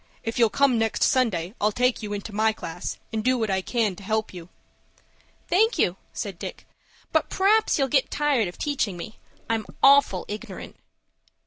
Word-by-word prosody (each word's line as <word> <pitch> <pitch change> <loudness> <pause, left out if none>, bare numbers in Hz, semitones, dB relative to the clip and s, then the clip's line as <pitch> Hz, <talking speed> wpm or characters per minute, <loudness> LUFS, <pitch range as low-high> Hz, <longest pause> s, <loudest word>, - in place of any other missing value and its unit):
If 225 +1 -3
you'll 230 -2 +5
come 255 +2 +3
next 225 -1 0
Sunday, 200 -8 +1
I'll 210 +1 +3
take 250 +3 +1
you 210 -1 -5
into 205 +1 -5
my 220 +1 +2
class, 175 -3 -6 0.2
and 220 -1 -1
do 255 +1 +2
what 220 -4 -1
I 190 0 +1
can 215 -2 0
to - - -11
help 220 +1 -1
you." 175 -1 -10 1.0
"Thank 445 +6 +3
you," 175 - +2 0.2
said 195 -4 -5
Dick, - - -7 0.5
"but - - +1
p'r'aps 430 +3 +3
you'll 275 -2 +2
get 270 0 +2
tired 285 -8 +1
of 175 - -9
teaching 265 - -1
me. 210 +5 -9 0.3
I'm 225 -2 -1 0.2
awful 275 -9 +5
ignorant." 210 +1 -7
220 Hz, 180 wpm, -25 LUFS, 200-260 Hz, 1.0 s, you'll